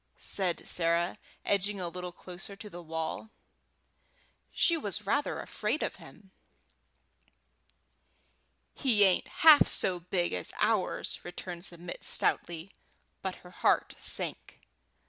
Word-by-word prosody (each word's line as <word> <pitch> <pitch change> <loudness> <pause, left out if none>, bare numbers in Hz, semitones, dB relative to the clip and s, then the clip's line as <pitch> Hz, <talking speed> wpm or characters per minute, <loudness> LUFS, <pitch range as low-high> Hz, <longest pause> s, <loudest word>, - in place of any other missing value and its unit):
said 185 -3 +3
Sarah, 170 +1 +1 0.3
edging 200 0 +1
a 180 - -1
little 180 +1 -6
closer 180 +3 -9
to 205 +1 -10
the 175 - -8
wall; 160 +5 -5 1.2
she 335 - +3
was 210 - -2
rather 285 +8 0
afraid - - -2
of - - -3
him. 195 -3 -16 2.4
"He 230 -7 +3
ain't 190 -2 +3
half 310 -2 +7
so 180 -1 +2
big 175 0 -1
as 90 -1 0
ours," - - 0
returned 175 0 -7
Submit, 175 0 -8
stoutly; 170 +2 0 0.5
but 190 -1 -3
her 180 - -12
heart - - +1
sank. - - -3
180 Hz, 115 wpm, -30 LUFS, 175-200 Hz, 2.4 s, half